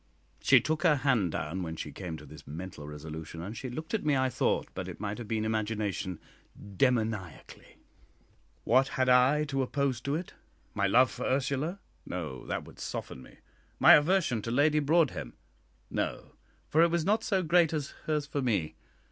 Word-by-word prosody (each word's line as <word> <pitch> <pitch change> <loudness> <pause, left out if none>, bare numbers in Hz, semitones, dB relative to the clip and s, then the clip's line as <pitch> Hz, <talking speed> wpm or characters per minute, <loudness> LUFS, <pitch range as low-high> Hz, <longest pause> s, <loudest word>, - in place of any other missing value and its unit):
She - - +6
took 155 0 -1
her 165 -5 +5
hand 125 - +1
down 85 +5 -3
when 80 -2 -4
she 75 - -6
came 85 -2 -6
to - - -12
this - - -13
mental 80 0 -7
resolution, 80 +2 -7
and 100 +5 -6
she 130 +2 -5
looked 155 - -7
at 220 - 0
me, 150 -2 +2
I 130 0 +2
thought, - - 0
but - - -5
it - - -8
might 105 +2 -4
have 120 - -7
been 110 -1 -1
imagination, 105 -4 -2 0.4
demoniacally. 110 - -2 0.9
What 130 +3 +4
had 130 -1 0
I 130 +4 +5
to 135 -3 -1
oppose 135 -2 -1
to 140 +1 -1
it? 170 +3 -5 0.4
My 100 - +1
love 125 +5 +5
for - - -5
Ursula? 140 +8 -1 0.2
No; 80 -8 -6
that - - -2
would - - -15
soften 65 - -5
me. - - -15 0.4
My - - +9
aversion 150 - +3
to 115 - -5
Lady 145 +5 +3
Broadhem? 155 0 +1 0.6
No; - - -3 0.4
for 160 - +3
it 170 - +5
was 170 -1 0
not 210 +3 +2
so 190 -3 +1
great 170 0 +4
as 150 -3 -3 0.2
hers 150 -2 0
for 145 -1 -3
me. 100 -11 0
125 Hz, 180 wpm, -30 LUFS, 95-150 Hz, 0.9 s, My